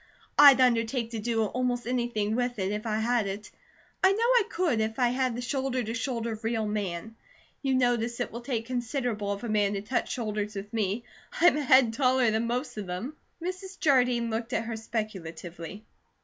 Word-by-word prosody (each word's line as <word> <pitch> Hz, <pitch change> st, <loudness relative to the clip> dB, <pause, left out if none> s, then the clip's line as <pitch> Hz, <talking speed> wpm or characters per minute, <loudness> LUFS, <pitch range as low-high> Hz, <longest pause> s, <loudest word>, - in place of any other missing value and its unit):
I'd 285 Hz, -2 st, +9 dB
undertake 235 Hz, -1 st, +2 dB
to 225 Hz, -, -3 dB
do 225 Hz, +1 st, 0 dB
almost 245 Hz, +2 st, -1 dB
anything 235 Hz, -4 st, -1 dB
with 245 Hz, 0 st, -1 dB
it, 190 Hz, -1 st, -1 dB
if 210 Hz, +2 st, -3 dB
I 215 Hz, -1 st, 0 dB
had 230 Hz, -1 st, +1 dB
it. 200 Hz, +2 st, -6 dB, 0.5 s
I 380 Hz, -, +7 dB
know 395 Hz, -, 0 dB
I 485 Hz, -1 st, +5 dB
could, 330 Hz, -11 st, +1 dB
if 220 Hz, +1 st, -2 dB
I 245 Hz, -2 st, +3 dB
had 255 Hz, -1 st, 0 dB
the 245 Hz, -, -4 dB
shoulder 260 Hz, 0 st, -1 dB
to 225 Hz, +1 st, -4 dB
shoulder, 230 Hz, -2 st, -2 dB
real 225 Hz, -1 st, -1 dB
man. 210 Hz, 0 st, -3 dB, 0.5 s
You 270 Hz, -2 st, +1 dB
notice 240 Hz, -2 st, +1 dB
it 245 Hz, -, -2 dB
will 235 Hz, -, -6 dB
take 235 Hz, -3 st, -2 dB
considerable 240 Hz, -4 st, -2 dB
of 200 Hz, +3 st, -4 dB
a -, -, -3 dB
man 205 Hz, -2 st, +2 dB
to 200 Hz, -, -2 dB
touch 245 Hz, +4 st, -1 dB
shoulders 215 Hz, -3 st, -3 dB
with 200 Hz, +2 st, -7 dB
me; 215 Hz, +1 st, -1 dB, 0.4 s
I'm 350 Hz, -1 st, +6 dB
a 300 Hz, -, 0 dB
head 260 Hz, -4 st, +5 dB
taller 255 Hz, -2 st, +3 dB
than 220 Hz, +2 st, 0 dB
most 250 Hz, +1 st, -3 dB
of 205 Hz, -3 st, -4 dB
them." 210 Hz, +12 st, -5 dB, 0.3 s
Mrs. 370 Hz, +1 st, -5 dB
Jardine 250 Hz, -5 st, +3 dB
looked 225 Hz, +1 st, -3 dB
at 230 Hz, -, 0 dB
her 230 Hz, 0 st, -4 dB
speculatively. 195 Hz, -4 st, -6 dB
235 Hz, 195 wpm, -28 LUFS, 215-255 Hz, 0.5 s, I'd